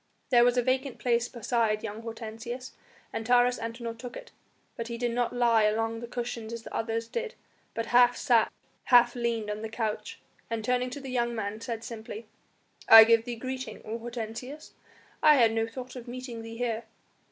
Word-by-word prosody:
There 240 -1 +7
was 245 +1 +3
a 245 - +3
vacant 260 +1 0
place 235 -1 +1
beside 230 -3 0
young 220 0 -5
Hortensius, 230 +2 -7 0.4
and 225 - -3
Taurus 245 +1 +3
Antinor 230 0 -5
took 245 +1 -8
it, - - -11 0.4
but 230 - -5
he 235 0 -5
did 240 0 -1
not 240 0 0
lie 235 -2 +3
along 225 +2 +1
the 235 - -7
cushions 235 -2 -5
as 230 -1 -6
the - - -10
others 225 0 -2
did 470 - -4 0.4
but 230 - -2
half 245 0 +6
sat, 235 -3 +3 0.3
half 240 -1 +6
leaned 235 -3 -2
on 210 +1 -5
the 225 - -5
couch, 215 -1 -3 0.3
and 225 -2 -3
turning 250 +1 +1
to 250 - -7
the 270 -2 -7
young 240 -1 0
man 215 0 -4
said 230 -2 -5
simply: 225 -1 -7 0.6
"I 225 0 +12
give 230 0 +4
thee 240 -1 -4
greeting, 260 +2 -5
O 225 +2 -4
Hortensius! 240 +5 -7 0.5
I 305 -1 +7
had 230 -4 +4
no 225 0 0
thought 255 +3 -8
of 250 -1 -8
meeting 245 -1 -6
thee 225 0 -8
here." 230 -2 -2
235 Hz, 190 wpm, -28 LUFS, 225-245 Hz, 0.6 s, I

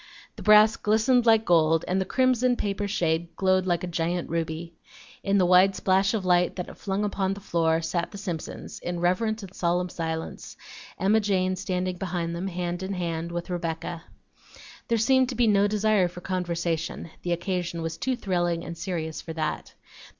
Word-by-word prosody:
The 220 - -10
brass 215 +2 +6
glistened 225 +3 +2
like 225 -1 +5
gold, 165 -2 +3
and 190 +1 +1
the - - -1
crimson 255 0 +2
paper 205 -2 -2
shade 170 -4 -1
glowed 185 -1 +2
like 175 -1 0
a 175 -2 -3
giant 175 0 -1
ruby. 165 0 -3 0.5
In 200 0 +2
the 185 - +4
wide 185 +2 +5
splash 195 +3 +2
of 200 -4 -2
light 180 -1 +3
that 180 - -5
it - - -12
flung 195 +1 -2
upon 195 -2 -1
the - - -9
floor 165 -4 +1
sat 170 +1 -1
the 200 - -9
Simpsons, 180 -6 -6
in 175 0 -4
reverent 215 +5 0
and 190 -1 -10
solemn 180 0 0
silence, 160 -1 -5 0.4
Emma 200 +5 +3
Jane 185 -3 +1
standing 185 -1 -2
behind 175 -2 -3
them, 180 +3 -3
hand 175 -1 -3
in 190 +1 -3
hand 170 -2 -3
with 175 +2 -4
Rebecca. 165 -1 -4 0.8
There 230 - +2
seemed 260 +3 +3
to 255 - -4
be 240 +1 +3
no 205 -2 +4
desire 210 -2 +2
for 175 0 -10
conversation; 170 -3 -2
the 175 - -1
occasion 175 -1 -2
was 165 0 -3
too 260 -1 0
thrilling 175 -6 -1
and 170 - -6
serious 165 -2 -4
for 160 - -7
that. 160 -1 -3
180 Hz, 185 wpm, -26 LUFS, 170-200 Hz, 0.8 s, brass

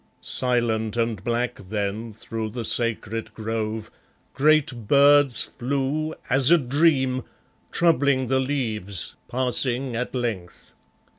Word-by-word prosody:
Silent 115 -3 0
and 115 -4 -1
black 120 +1 -1
then 105 +2 -3
through 110 +1 -5
the 115 +1 -5
sacred 115 -1 0
grove 110 0 -4 0.4
Great 135 -5 +2
birds 140 -2 +5
flew, 140 +5 -2
as 135 +1 +4
a 175 - +7
dream, 135 -2 +2 0.5
troubling 140 -6 +2
the 130 +1 +1
leaves, 110 - -3 0.2
passing 125 0 0
at 125 +2 -3
length. 110 -8 -5
120 Hz, 105 wpm, -24 LUFS, 110-135 Hz, 0.5 s, a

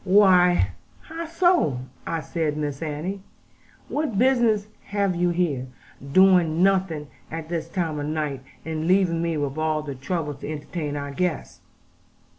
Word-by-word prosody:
'Why, 180 - +5 0.3
how 330 +1 -6
so?' 335 - +2 0.4
said 155 +1 -1
I; - - -6
'Miss 145 -1 -3
Annie, 165 +6 -3 0.7
what 295 -8 -2
business 235 -4 +3 0.2
have 200 -2 0
you 175 +1 +2
here, 165 -7 0 0.4
doing 180 -2 +5
nothing 190 -6 +2 0.2
at 160 0 -6
this 165 -1 -3
time 165 -4 -2
of 145 - -3
night? 150 -3 -2 0.2
And 160 0 -3
leaving 180 -3 +3
me 165 -2 0
with 145 0 -2
all 155 -1 0
the 145 -2 -5
trouble 150 +3 -3
to 140 +2 -7
entertain 150 0 -4
our 140 -1 -4
guests!' 170 +2 -2
165 Hz, 145 wpm, -24 LUFS, 150-190 Hz, 0.7 s, Why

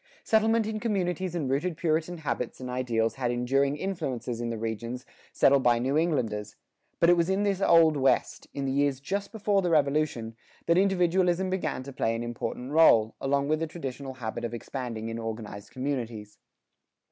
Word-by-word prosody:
Settlement 220 0 +3
in 215 0 -3
communities 185 -5 -1
and 155 -6 -1
rooted 155 +6 -1
Puritan 165 +1 0
habits 145 -6 -3
and 125 -1 -6
ideals 115 -3 0
had 125 -2 -1
enduring 135 +4 +1
influences 130 -10 -3
in 120 - -2
the 115 - -3
regions 115 +3 -4 0.3
settled 140 0 +4
by 120 -2 +4
New 130 +4 0
Englanders; 125 -11 0 0.4
but 170 - +5
it 175 - +6
was 170 +1 +1
in 195 +2 +1
this 200 -2 0
Old 165 -4 +5
West, 135 -1 +1
in 140 - -4
the 135 - -1
years 140 -1 +1
just 200 +8 -3
before 210 -3 +1
the 180 - 0
Revolution, 140 -7 +1 0.3
that 170 - +3
individualism 185 -1 +2
began 185 -8 -2
to 140 +1 -9
play 115 -2 0
an 115 - -3
important 120 +2 -5
rôle, 115 -9 +5
along 140 +1 +1
with 155 +1 +1
the 165 - -2
traditional 135 -4 -6
habit 115 -2 -5
of 120 0 -3
expanding 120 -2 -5
in 115 0 -4
organized 110 -2 -6
communities. 115 -6 -4
140 Hz, 180 wpm, -28 LUFS, 120-175 Hz, 0.4 s, it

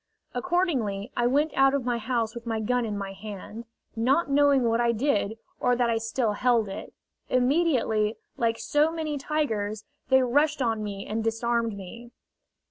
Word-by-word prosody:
Accordingly, 250 - -1
I 240 0 +2
went 290 +5 +2
out 270 0 +4
of 270 -3 -2
my 240 -1 0
house 230 -1 -1
with 235 0 -9
my 225 -1 -1
gun 245 +2 0
in 210 -2 -3
my 195 -1 -5
hand, 210 +3 -8 0.3
not 270 +7 +2
knowing 280 -2 +4
what 230 0 +2
I 235 -1 +2
did 220 -3 0 0.2
or 245 - +2
that 240 -1 +1
I 225 - +1
still 225 0 0
held 230 0 +2
it. 195 - -7 0.4
Immediately, 250 -6 +2 0.2
like 230 -1 0
so 300 +2 +2
many 310 -3 -3
tigers, 220 -9 -2 0.2
they 265 -1 +5
rushed 290 +5 +2
on 225 -4 0
me 200 -1 -5
and 220 +1 -2
disarmed 230 -1 0
me. 230 +5 -10
235 Hz, 170 wpm, -26 LUFS, 220-270 Hz, 0.4 s, they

